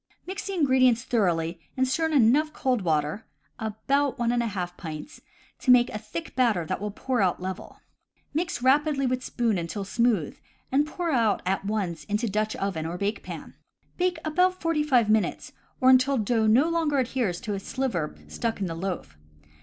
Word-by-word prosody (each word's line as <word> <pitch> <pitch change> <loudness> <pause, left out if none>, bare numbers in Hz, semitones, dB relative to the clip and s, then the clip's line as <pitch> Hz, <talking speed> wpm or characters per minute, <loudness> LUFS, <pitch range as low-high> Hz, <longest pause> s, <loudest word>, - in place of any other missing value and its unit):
Mix 375 +2 -5
the 395 - -3
ingredients 260 -6 +3
thoroughly 170 -8 0 0.2
and 260 0 +2
stir 320 +5 +1
in 320 - -3
enough 285 +4 +4
cold 255 -5 0
water 155 +3 -1 0.3
(about 270 +6 0
one 235 -1 +1
and 240 0 +1
a 235 - -1
half 180 -4 -4
pints) 160 - -8 0.4
to - - -3
make 250 -1 +6
a 215 - -4
thick 220 +10 -7
batter 230 -10 +2
that 185 +4 -3
will 210 - -2
pour 245 +3 -1
out 185 -2 +1
level. 185 +1 -7 0.5
Mix 325 -5 -2
rapidly 280 +1 +3
with 255 0 -1
spoon 230 -7 0
until 170 +4 -4
smooth, 220 -6 0 0.3
and 285 +3 +3
pour 340 +1 -2
out 230 -6 +2
at 190 +1 -1
once 195 -6 -2
into 210 +3 -1
Dutch 215 +1 -1
oven 185 -5 -2
or 170 +2 -4
bake 200 +3 -2
pan. - - -8 0.4
Bake 360 -1 +1
about 365 +4 +2
forty 330 -2 +1
five 255 -7 +3
minutes, 215 0 0 0.3
or 260 0 +6
until 260 +1 +4
no 220 0 +1
dough 300 +6 +3
adheres 240 -8 0
to 210 - -3
a 200 - -2
sliver 195 - -2
stuck 230 -2 -3
into 190 -3 -2
the 165 - -7
loaf. 180 - -4
235 Hz, 185 wpm, -26 LUFS, 195-275 Hz, 0.5 s, make